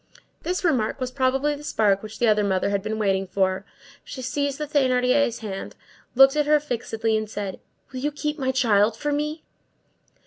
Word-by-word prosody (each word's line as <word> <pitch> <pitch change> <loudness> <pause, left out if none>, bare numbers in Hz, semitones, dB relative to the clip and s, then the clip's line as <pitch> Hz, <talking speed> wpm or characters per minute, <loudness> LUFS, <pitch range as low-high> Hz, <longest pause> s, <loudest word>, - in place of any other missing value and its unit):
This 365 +2 -2
remark 265 -9 +1
was 255 -1 -3
probably 270 +2 +1
the 290 0 -8
spark 205 -8 +2
which 215 0 -9
the 240 - +2
other 210 -1 +3
mother 195 0 0
had 200 -1 0
been 215 +2 -3
waiting 195 -2 0
for. 190 0 0 0.4
She 260 - -8
seized 280 +2 -1
the 300 - -3
Thénardier's 255 -3 +2
hand, 195 -2 -6 0.4
looked 270 +2 +7
at 300 -1 +1
her 300 0 +5
fixedly, 225 -5 -2
and 215 -1 -2
said:— 200 -3 -5 0.3
"Will 260 - -5
you 295 +3 -1
keep 300 +1 -3
my 260 -1 0
child 220 -4 +2
for 295 - -2
me?" 300 +2 -2
250 Hz, 185 wpm, -24 LUFS, 210-285 Hz, 0.4 s, looked